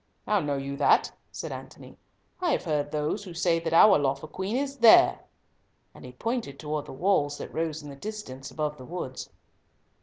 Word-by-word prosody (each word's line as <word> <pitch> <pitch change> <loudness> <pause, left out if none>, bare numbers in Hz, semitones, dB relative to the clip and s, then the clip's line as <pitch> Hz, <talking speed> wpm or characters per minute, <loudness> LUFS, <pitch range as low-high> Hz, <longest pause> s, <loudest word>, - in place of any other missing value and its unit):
"How 210 -1 +2
know 145 -5 -1
you 140 0 -5
that?" 145 - +3 0.2
said - - -6
Antony. - - -10 0.4
"I 350 -4 +1
have - - -1
heard 150 -3 -1
those 150 +7 -2
who 180 -4 -10
say 170 -1 +2
that 165 -1 -3
our 190 +2 +7
lawful 140 +2 -1
Queen 190 +6 -3
is 275 0 -3
there," 230 -2 +7 0.7
and - - -14
he 125 - -9
pointed 225 - -3
towards 150 0 -4
the - - -8
walls 145 -2 +1
that - - -8
rose 160 -2 -2
in 145 - -9
the - - -9
distance 140 -8 -7
above 150 +2 -3
the 130 - -11
woods. 145 -6 -6
155 Hz, 190 wpm, -27 LUFS, 145-195 Hz, 0.7 s, our